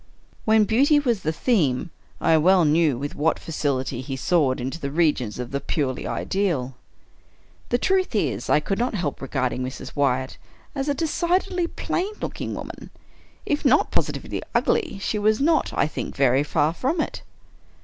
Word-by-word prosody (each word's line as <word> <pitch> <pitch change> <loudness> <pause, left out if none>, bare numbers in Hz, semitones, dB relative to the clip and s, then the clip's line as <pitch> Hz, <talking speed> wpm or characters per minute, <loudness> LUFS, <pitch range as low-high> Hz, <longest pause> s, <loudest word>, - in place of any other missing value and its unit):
When 220 0 +5
beauty 270 +8 +4
was 240 -8 0
the 155 - 0
theme, 160 - +1 0.3
I 165 - +3
well 175 +2 +5
knew 155 -3 +3
with 145 +3 -4
what 155 +2 +1
facility 135 -5 -2
he 135 +1 -5
soared 140 -2 +1
into 130 +6 -4
the 140 - -3
regions 145 -8 +1
of 125 -1 -5
the 140 0 -2
purely 135 -5 -2
ideal. 160 -11 -1 0.9
The 245 - +2
truth 375 -1 +1
is, 210 - -1
I 150 - +4
could 195 +7 -2
not 245 -1 0
help 165 -7 -3
regarding 130 -2 -1
Mrs. 130 +1 -6
Wyatt 130 -2 0 0.3
as 275 0 -2
a 285 - +1
decidedly 350 +3 0
plain 380 +4 -3
looking - - -4
woman. - - -8 0.6
If 295 - -1
not 280 0 +3
positively - - -2
ugly, 430 - +1
she 210 +2 -1
was 215 +1 +2
not, 315 +3 +2
I - - +1
think, 155 - -5
very 135 -1 +3
far 150 +1 +1
from 275 - -1
it. - - -2
165 Hz, 165 wpm, -24 LUFS, -, 0.9 s, When